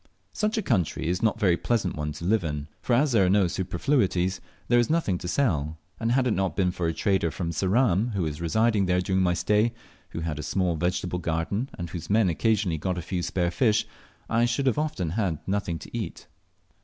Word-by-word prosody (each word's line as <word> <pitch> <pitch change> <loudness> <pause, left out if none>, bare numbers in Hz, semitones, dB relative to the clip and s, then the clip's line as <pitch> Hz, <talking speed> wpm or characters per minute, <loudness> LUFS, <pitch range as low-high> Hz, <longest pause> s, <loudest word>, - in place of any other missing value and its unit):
Such 215 +1 0
a 220 - 0
country 95 - 0
is 90 +2 0
not 110 -2 +2
a - - -15
very 95 -6 +4
pleasant 105 -3 -1
one 75 0 -3
to 80 +3 -7
live 105 +1 +2
in, 75 -2 -3
for 125 - 0
as 135 +4 +3
there 110 -5 +4
are - - +2
no 100 0 +4
superfluities, 95 - 0 0.3
there 120 0 +4
is 120 - +1
nothing 155 - +1
to - - -6
sell; 80 - 0 0.2
and 115 +1 +1
had 130 0 +3
it 125 - +2
not 95 -4 0
been 90 -2 +2
for 90 -1 -2
a 80 - 0
trader 95 -2 +1
from 85 +1 -3
Ceram 105 +3 +2
who 95 - 0
was 75 0 -4
residing 105 +3 +2
there 90 0 +2
during 95 +1 +1
my 90 -1 +2
stay, 105 +5 +2 0.4
who 85 - -5
had 80 -2 -3
a - - -2
small 90 +1 0
vegetable 90 +2 -1
garden, 85 +9 -2
and 85 -2 -5
whose 85 -3 -6
men 105 -2 +4
occasionally 95 -2 +1
got 90 +3 -2
a - - -2
few 90 0 -2
spare 85 0 0
fish, 110 +3 +2 0.4
I 115 +1 +2
should 130 +1 +1
often 150 - -2
have 100 -2 0
had - - -17
nothing 95 -4 -1
to - - -10
eat. - - -5
95 Hz, 225 wpm, -26 LUFS, 85-115 Hz, 0.4 s, very